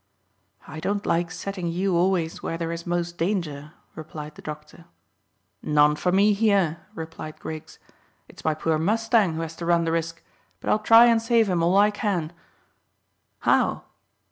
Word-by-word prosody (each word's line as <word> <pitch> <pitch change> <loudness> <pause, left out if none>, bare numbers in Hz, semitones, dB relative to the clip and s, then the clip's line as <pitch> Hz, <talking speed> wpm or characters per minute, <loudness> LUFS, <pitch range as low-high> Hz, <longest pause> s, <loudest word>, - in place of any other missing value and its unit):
"I 155 0 -8
don't 200 +5 -2
like 170 0 +1
setting 180 0 -5
you 180 +2 0
always 175 -2 0
where 165 - -3
there 165 0 -3
is 170 0 -6
most 175 0 -2
danger," 165 -5 -2 0.2
replied 155 -1 -8
the - - -14
doctor. 150 +2 -9 0.8
"None 150 0 +3
for 180 +4 0
me 200 +3 +4
here," 200 -6 +2 0.2
replied 160 -1 -8
Griggs. 160 0 -8 0.5
"It's - - -15
my 155 -1 +1
poor 155 0 0
mustang 220 0 +2
who 165 - -3
has 165 0 -6
to 170 - -5
run 170 -1 +3
the 165 - 0
risk; 165 0 -3 0.4
but - - -2
I'll 215 - +3
try 225 +2 +7
and 230 -1 +4
save 230 -1 +3
him 175 -2 +1
all 175 +3 +3
I 205 +1 +5
can." 190 -7 -2 1.1
"How?" - - +2
170 Hz, 170 wpm, -24 LUFS, 160-200 Hz, 1.1 s, try